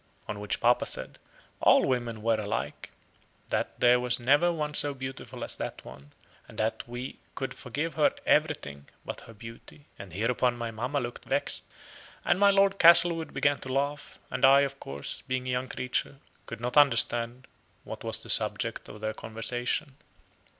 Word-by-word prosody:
On 105 - -5
which 105 -1 -2
papa 120 +1 +3
said - - -5 0.4
"All - - +6
women 120 -4 -2
were 115 -1 +2
alike; 105 0 -4 0.6
that - - -2
there 125 0 +5
was 125 0 0
never 145 +8 +4
one 150 -3 -3
so 145 -1 +1
beautiful 130 0 -7
as - - -4
that - - -6
one; 70 +2 -12 0.4
and - - -14
that 110 +1 -1
we 120 +2 -6 0.2
could 135 - -4
forgive 145 +6 -4
her 155 - +3
everything 70 0 0 0.2
but - - -6
her 115 - -13
beauty." 115 +6 -12
And 100 -3 -9
hereupon 120 +5 0
my 115 -1 -4
mamma 125 +6 -2
looked 120 -2 -6
vexed, - - 0 0.6
and 175 - +2
my 200 0 +6
Lord 195 0 +3
Castlewood 170 -1 +6
began 145 +1 +1
to 130 - -6
laugh; 140 +2 -2
and - - -4
I, 135 +1 +8
of 140 0 -2
course, 70 +1 -5
being 130 0 -2
a - - -1
young 125 +1 -1
creature, 125 +3 -3 0.3
could 115 - -7
not 125 +4 -2
understand 120 -2 +3 0.4
what - - -8
was - - -3
the - - -12
subject - - +2
of 105 - -11
their 110 0 -2
conversation. 120 +6 -3
125 Hz, 170 wpm, -28 LUFS, 115-140 Hz, 0.6 s, I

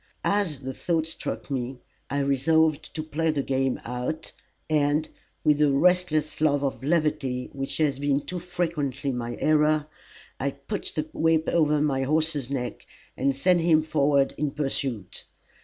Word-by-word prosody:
As 190 -9 +1
the 130 0 -4
thought 165 +1 0
struck 140 -6 -5
me, 130 -1 -2 0.3
I 140 0 0
resolved 155 +3 +2
to 155 - -2
play 160 +1 -1
the 145 -3 0
game 135 -1 0
out, 125 +7 -4 0.4
and, 150 0 +2 0.4
with 150 -1 +3
a 150 -2 +5
restless 155 0 +2
love 145 -2 +3
of 135 -1 -2
levity 145 -5 0
which 135 0 -4
has 145 -4 +1
been 145 0 +1
too 155 +6 -5
frequently 155 -6 -2
my 120 -1 -4
error, 155 0 +3 0.5
I 140 - 0
put 140 +9 -5
the 155 0 -1
whip 160 0 +2
over 150 -3 +3
my 140 -3 +1
horse's 150 -1 +1
neck, 125 -3 -4 0.3
and 135 +1 +1
sent 175 +5 +3
him 160 -2 +4
forward 140 -3 +2
in 150 0 +1
pursuit. 135 -8 -3
150 Hz, 155 wpm, -26 LUFS, 135-160 Hz, 0.5 s, a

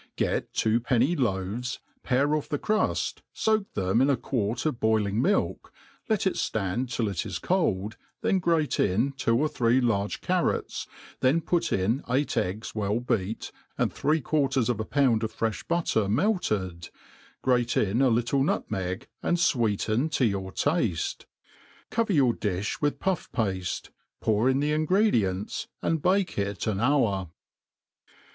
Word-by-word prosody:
GET - - -1
two 110 +1 +2
penny 125 +7 +2
loaves, 115 - -1 0.2
pare 140 +3 +1
off 150 - -3
the 150 - 0
cruft, 215 +7 0
foak 215 -2 0
them 95 +5 +1
in 135 - +4
^ 140 - +3
C[uarc 120 -1 -2
of 150 -6 -1
boiling 110 -1 +2
milk, 195 +9 0 0.4
let 215 -3 +1
it 190 - +2
ftand 110 +5 -1
till 115 -5 0
it 100 -4 -2
is - - -4
cold, 100 +4 0 0.3
tb^n 190 - +2
grate 165 -4 +1
iii 115 +9 +2
two 115 -3 +1
or 150 +4 +2
three 120 -3 +2
large 105 -5 0
carrots, - - -1 0.3
then 130 +6 +3
put 170 +1 0
in 110 +9 +1
eight 135 +4 +1
eggs 95 +5 -2
well 105 +1 0
beat, 110 -3 -2 0.3
and - - 0
three 155 +3 +1
quarters 135 -4 +1
of 120 -4 0
a 110 - -2
pound 130 -5 +2
of 110 - -2
frefii 110 -2 -3
butter 160 - +1
melted, 105 - 0 0.5
grate 125 -2 +3
ii^ 105 +5 +2
a 130 - +5
little 120 +4 +2
nutmeg, 95 -8 -2
and 175 - +1
fweeten 120 - +1
to 135 -5 +1
yOur 95 -2 -3
tafte. 115 - -1 0.7
Cover 230 -2 +1
your 135 -7 +4
d^(h 100 -1 -3
With 145 0 +1
pufF 190 -2 -1
paAc, 95 -6 -2 0.3
pour 110 +3 +2
in 135 +1 +2
the 150 +1 +1
ingredients, 150 - +1 0.2
aad 160 -2 0
bake 190 - +1
it 100 0 -2
an 105 -3 -1
hour. 110 - +2
120 Hz, 155 wpm, -27 LUFS, 105-145 Hz, 0.7 s, a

